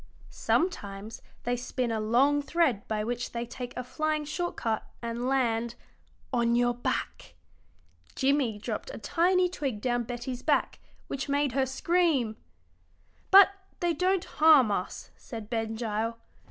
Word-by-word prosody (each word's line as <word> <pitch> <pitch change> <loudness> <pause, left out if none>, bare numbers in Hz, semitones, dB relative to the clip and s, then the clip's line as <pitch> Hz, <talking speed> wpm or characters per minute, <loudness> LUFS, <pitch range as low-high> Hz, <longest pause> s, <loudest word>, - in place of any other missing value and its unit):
Sometimes 215 - -2 0.2
they 245 +1 0
spin 245 0 -2
a 220 - -1
long 260 +7 +3
thread 285 -8 +1
by 215 -1 -1
which 240 +2 -3
they 235 0 -2
take 245 +1 -7
a 250 - -2
flying 305 +4 -1
short 350 +4 -3
cut 225 -2 -2
and 235 +1 -3
land 235 -3 +1 0.6
on 235 -1 +2
your 245 0 +3
back." 245 - -4 0.8
Jimmie 265 -5 +1
dropped 210 - -5
a - - -7
tiny 360 +2 +2
twig 275 -10 -3
down 240 +2 0
Betty's 245 +1 -5
back, - - +1 0.3
which 275 +1 -4
made 285 -1 +1
her 265 +1 +1
scream. 275 -5 +1 0.9
"But 390 0 +9 0.3
they 345 -1 +1
don't 370 +3 +1
harm 300 -8 +5
us," 185 -2 -4
said 225 -2 -9
Ben 225 -1 -1
Gile. 225 0 -2
245 Hz, 140 wpm, -28 LUFS, 230-295 Hz, 0.9 s, But